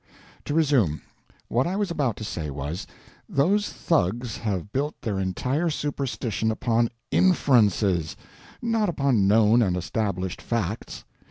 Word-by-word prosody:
To 145 - -2
resume. 135 - +2 0.4
What 125 +5 +1
I 180 - -2
was 200 -3 -1
about 140 - 0
to - - -6
say 80 -7 -4
was, 70 +5 -5 0.4
those 195 +9 +2
thugs 120 - 0
have 105 -3 -3
built 145 +3 -2
their 105 -5 -1
entire 125 - 0
superstition 135 -7 -2
upon 115 +1 +1 0.2
inferences, 105 - +3 0.5
not 225 -3 +1
upon 135 - +2
known 110 +3 +5
and 90 -5 +1
established 90 +1 -2
facts. 110 -3 -3
115 Hz, 125 wpm, -25 LUFS, 95-145 Hz, 0.5 s, known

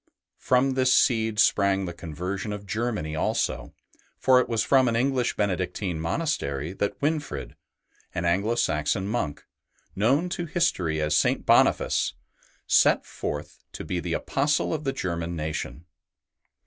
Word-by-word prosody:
From 130 +2 +2
this 130 -1 +2
seed 110 -4 +3
sprang 100 -3 +3
the 85 - -5
conversion 90 +5 -5
of 105 0 -6
Germany 105 -6 -2
also, 80 - -1 0.4
for 130 -1 +5
it - - -1
was 115 -2 +1
from 130 -2 +4
an 115 - +1
English 125 0 +1
Benedictine 90 -3 -2
monastery 80 - -2
that 100 +1 -2
Winfrid, 145 - -2 0.6
an 85 - -1
Anglo 100 +7 +1
Saxon 80 0 0
monk, 105 -10 -3 0.5
known 130 - +2
to 175 -1 -3
history 95 - 0
as 75 0 +1
St. - - +2
Boniface, - - +3 0.5
set - - +4
forth - - -6
to - - -7
be 90 - -2
the 85 0 -3
Apostle 145 - 0
of 155 -1 -4
the 135 - 0
German 85 -1 -3
nation. 80 0 -4
100 Hz, 140 wpm, -26 LUFS, 85-130 Hz, 0.6 s, for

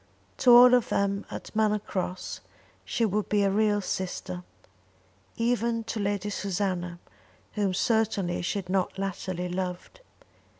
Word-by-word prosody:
To 245 - +5
all 245 +1 +9
of 245 -2 +3
them 200 0 0
at - - -8
Manor 215 -1 +3
Cross 185 -3 -4 0.4
she 230 - 0
would 210 0 -1
be 205 -1 +3
a 195 - +2
real 205 0 +2
sister, 185 -1 -4 0.9
even 230 0 0
to 220 0 -4
Lady 205 0 -1
Susanna 185 -3 -2 0.6
whom 200 -3 0
certainly 210 -4 +1
she 175 +4 -2
had 190 -3 -5
not 185 0 0
latterly 185 -2 -3
loved. 180 - -5
200 Hz, 135 wpm, -27 LUFS, 185-220 Hz, 0.9 s, all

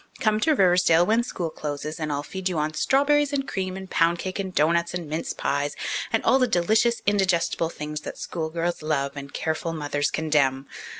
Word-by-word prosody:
Come 215 -4 +2
to 310 +7 +3
Riversdale 180 -4 +4
when 225 +4 +3
school 175 -8 -4
closes, 150 +2 -5
and 155 -1 -2
I'll 145 0 -2
feed 190 +3 -3
you 175 - -2
on 155 0 -1
strawberries 285 - +2
and 275 -1 -1
cream 185 -1 -3
and 190 0 -8
pound 170 -1 +2
cake 185 +3 -5
and 190 -1 -3
doughnuts 170 +2 +1
and 175 -3 -4
mince 160 - -3
pies, - - -1 0.4
and - - +1
all 265 - +5
the 255 - +3
delicious, 220 +4 +2
indigestible 185 -5 +1
things 150 -2 -6
that - - -7
school 160 -2 -4
girls 170 +1 -2
love 145 -3 -1
and 140 0 -8
careful 160 +1 -2
mothers 145 -2 -1
condemn. 140 -4 +1
170 Hz, 195 wpm, -25 LUFS, 155-195 Hz, 0.4 s, all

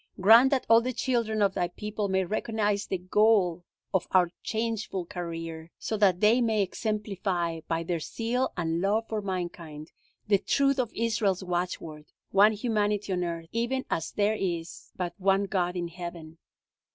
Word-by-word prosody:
Grant 225 +7 +7
that 270 -2 0
all 230 0 +6
the 255 +2 -2
children 230 -4 0
of 195 -1 +2
Thy 175 -2 0
people 210 +3 -4
may 190 -1 +1
recognize 210 0 -1
the 190 - -1
goal 185 -2 +2 0.3
of 190 - +1
our 180 -2 +3
changeful 220 -5 -2
career, 165 -2 -6
so 220 - -3
that 195 -4 +3
they 225 +4 +5
may 220 -3 +2
exemplify, 195 -5 -2
by 165 0 -1
their 170 0 -2
zeal 240 +9 -2
and 165 -1 -1
love 215 +4 +1
for 220 -1 -2
mankind, 170 -5 -5 0.4
the 200 -2 +4
truth 275 +4 +2
of 240 -3 0
Israel's 210 -5 0
watchword: 175 -4 -3 0.3
One 205 +3 +6
humanity 210 -3 0
on 180 -1 0
earth, 170 -1 -4
even 240 +3 -1
as 165 - -1
there 210 +1 +2
is 175 -5 -4
but 180 -2 -3
one 195 +1 +3
God 185 -3 -1
in 175 -1 -2
heaven. 170 -2 -8
195 Hz, 165 wpm, -28 LUFS, 175-220 Hz, 0.4 s, Grant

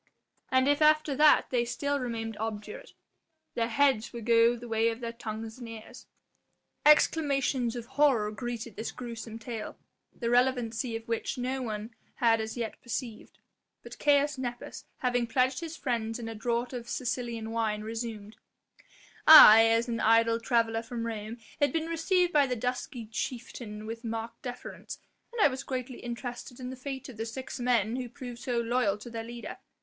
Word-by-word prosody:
And 260 +1 +3
if 290 +1 +2
after 305 -1 +4
that 300 0 +5
they 245 -2 +2
still 285 +4 -2
remained 225 -3 -4
obdurate, 225 - -6 0.6
their 230 -1 0
heads 260 -2 +2
would 235 -2 -7
go 230 0 +5
the 240 0 -9
way 225 0 +2
of 225 0 -5
their 235 -1 -5
tongues 220 0 -6
and 240 -2 -8
ears." 225 -1 -11 0.8
Exclamations 275 -5 +3
of 240 -2 -5
horror 245 -7 +2
greeted 235 -1 -5
this 220 - -4
gruesome 230 -2 -7
tale, 225 -2 -6 0.3
the 235 -1 -3
relevancy 245 -1 +1
of 225 0 -7
which 230 +3 -2
no 255 +2 -2
one 220 -1 -5 0.2
had 225 -2 +3
as 220 +2 -5
yet 230 -2 -4
perceived. 230 -1 -6 0.5
But - - -11
Caius 290 -1 +3
Nepos, 245 -2 -6 0.2
having 245 -2 +1
pledged 255 +2 +1
his 330 -1 -6
friends 230 -3 -2
in 235 -2 -6
a 225 - -5
draught 235 +3 -2
of 235 -2 -6
Sicilian 235 -3 -3
wine, 220 -2 -1
resumed: 220 -1 -6 0.9
"I, 225 -8 +11
as 230 +2 +2
an 230 -1 -2
idle 230 +1 +4
traveller 230 -1 +1
from 230 0 -5
Rome 220 0 -5 0.2
had 285 -2 +3
been 320 +2 -1
received 350 +2 +1
by 290 -2 +5
the 250 - -1
dusky 250 +1 -4
chieftain 225 -2 -6
with 225 +2 -6
marked 230 0 -5
deference, 245 -1 -7 0.3
and 475 - -7
I - - +8
was 265 -1 -4
greatly 255 -1 -5
interested 245 +1 -6
in 250 0 -5
the - - -6
fate 265 0 -6
of 255 -5 -11
the 225 - -3
six 260 +3 -6
men 240 -2 +1
who 250 -2 -4
proved 245 0 -9
so 245 -1 -1
loyal 230 -3 +1
to 215 +3 -10
their 225 -1 -4
leader. 235 +1 -8
235 Hz, 175 wpm, -29 LUFS, 225-255 Hz, 0.9 s, I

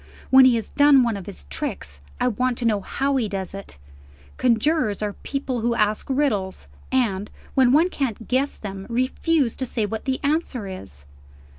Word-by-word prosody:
When 265 0 +9
he 255 -2 +5
has 225 - -3
done 285 -2 +5
one 230 -3 0
of 195 -3 -8
his 70 - -8
tricks, 70 +1 -5 0.2
I - - +2
want 250 +1 0
to 240 - -3
know 210 -3 +2
how 275 +6 -1
he 225 -5 0
does 190 -2 -4
it. 195 - -9 0.6
Conjurers 235 -2 +1
are 205 -1 -2
people 270 -2 -4
who 235 +1 +1
ask 210 -1 0
riddles, 210 - -1 0.2
and, 210 -6 0 0.2
when 260 -3 +4
one 320 +6 +4
can't 240 - -3
guess 265 +3 0
them, 195 -2 -7
refuse 255 +2 +1
to 260 - -2
say 225 -2 -1
what 220 +1 -5
the 265 -1 -1
answer 285 -6 -1
is. 95 - -9
235 Hz, 180 wpm, -23 LUFS, 200-265 Hz, 0.6 s, When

